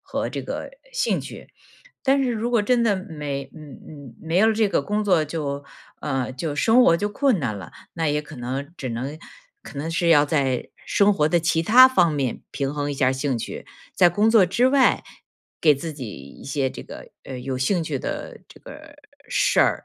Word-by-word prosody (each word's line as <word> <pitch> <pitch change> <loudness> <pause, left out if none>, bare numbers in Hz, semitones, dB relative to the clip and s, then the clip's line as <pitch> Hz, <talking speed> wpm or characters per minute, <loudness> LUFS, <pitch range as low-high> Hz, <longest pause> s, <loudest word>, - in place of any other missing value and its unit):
和 - - -3
这 - - -5
个 - - -6 0.2
兴 - - 0
趣。 - - -10 0.6
但 275 0 +3
是 250 -2 0
如 230 +1 -2
果 235 -2 +3
真 240 +2 +2
的 220 -3 +3
没 150 -7 -5
嗯， 155 -4 -12
嗯， 140 -6 -11
没 160 +1 -2
有 220 +3 +5
这 215 -1 +2
个 170 -6 +1
工 210 +7 -1
作 180 -6 +3
就， 145 -2 -4 0.4
呃， 135 -3 -2
就， 145 +3 -4
生 230 +10 +5
活 170 - +5
就 205 +4 -1
困 245 +1 +1
难 120 -9 -2
了， 95 - -9 0.2
那 165 -2 -1
也 150 0 0
可 150 +1 -12
能 135 +4 -5
只 130 - -5
能 130 +6 -4 0.5
可 140 - -9
能 150 +3 -3
是 170 +1 0
要 150 -3 +6
在 140 -4 -1
生 205 0 +3
活 150 -4 +2
的 175 - +3
其 165 0 +1
他 245 +9 +8
方 180 -11 +3
面 135 -5 -2
平 140 0 -3
衡 145 0 -2
一 - - -3
下 135 -1 +1
儿 - - +1
兴 130 -1 -1
趣， - - -7 0.3
在 180 - +6
工 205 +6 +2
作 225 -4 +6
之 210 +8 +2
外 265 0 +3 0.6
给 150 -3 +5
自 160 +4 -5
己 140 -3 -8
一 70 -5 -12
些 140 -1 -1
这 - - -9
个， - - -11
呃， 130 -2 -7
有 130 +1 -4
兴 165 +7 0
趣 145 -4 -3
的 - - -6
这 - - -16
个 - - -13 0.3
事 - - +2
儿。 - - +2
155 Hz, 225 characters per minute, -23 LUFS, 140-205 Hz, 0.6 s, 他